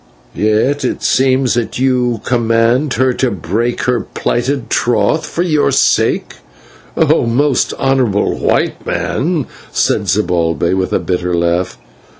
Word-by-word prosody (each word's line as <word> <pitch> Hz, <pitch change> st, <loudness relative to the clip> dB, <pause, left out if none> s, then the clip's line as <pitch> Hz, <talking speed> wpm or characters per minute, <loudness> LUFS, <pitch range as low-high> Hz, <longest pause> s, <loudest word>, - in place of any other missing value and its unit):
"Yet 110 Hz, +7 st, +1 dB
it 125 Hz, -, -2 dB
seems 130 Hz, -1 st, +2 dB
that 120 Hz, -2 st, -2 dB
you 125 Hz, -3 st, 0 dB
could -, -, -12 dB
command 120 Hz, +3 st, +1 dB
her 130 Hz, +2 st, +2 dB
to 130 Hz, +1 st, 0 dB
break 110 Hz, +5 st, -2 dB
her 125 Hz, -1 st, +1 dB
plighted 125 Hz, +2 st, -2 dB
troth 120 Hz, +6 st, +1 dB
for 175 Hz, -, -2 dB
your 155 Hz, -4 st, +1 dB
sake, -, -, +1 dB, 0.6 s
O -, -, +2 dB
most 135 Hz, +3 st, +1 dB
honourable 130 Hz, -7 st, +1 dB
White -, -, 0 dB
Man," 155 Hz, -1 st, -1 dB, 0.3 s
said -, -, 0 dB
Zibalbay 85 Hz, -4 st, 0 dB
with 95 Hz, -1 st, -1 dB
a -, -, +2 dB
bitter 90 Hz, -1 st, -2 dB
laugh. 85 Hz, +2 st, -1 dB
120 Hz, 135 wpm, -15 LUFS, 100-130 Hz, 0.6 s, seems